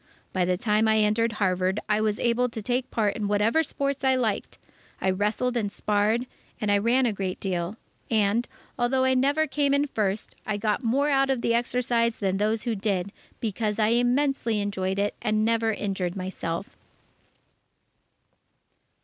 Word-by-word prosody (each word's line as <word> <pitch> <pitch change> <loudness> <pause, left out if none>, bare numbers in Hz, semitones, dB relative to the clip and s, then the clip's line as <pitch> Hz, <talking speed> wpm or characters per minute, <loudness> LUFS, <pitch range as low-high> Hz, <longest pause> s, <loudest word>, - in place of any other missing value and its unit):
By 185 -2 +1
the 180 0 +1
time 215 +2 +2
I 220 0 +4
entered 215 +2 +2
Harvard, 190 -1 0
I 215 0 +2
was 215 -1 0
able 245 +1 +1
to 225 -1 -6
take 250 +3 -1
part 210 -3 0
in 210 -2 -2
whatever 210 +9 +2
sports 280 -2 -2
I 265 -1 +4
liked. 225 -5 -1 0.4
I 190 - +1
wrestled 210 +6 0
and 210 -4 -1
sparred, 215 +4 +1 0.3
and 210 -3 0
I 205 - +4
ran 245 +5 +3
a 230 - +1
great 190 -2 -3
deal, 180 0 -2 0.3
and, 220 +1 +2 0.3
although 260 +2 +2
I 260 0 +3
never 280 +4 +2
came 285 -2 +1
in 285 +1 +2
first, 210 -6 -2
I 210 -1 -2
got 210 +3 0
more 275 +6 +2
out 270 -1 +3
of 265 -3 0
the 235 - +1
exercise 235 -1 +1
than 195 -2 0
those 215 +2 0
who 235 -2 -1
did, 200 -2 -1 0.3
because 215 -1 -2
I 215 -1 +3
immensely 245 -1 +1
enjoyed 190 -2 -2
it 205 +1 0
and 215 0 +1
never 225 0 +2
injured 190 -4 -2
myself. 185 -1 -4
220 Hz, 170 wpm, -26 LUFS, 205-245 Hz, 0.4 s, I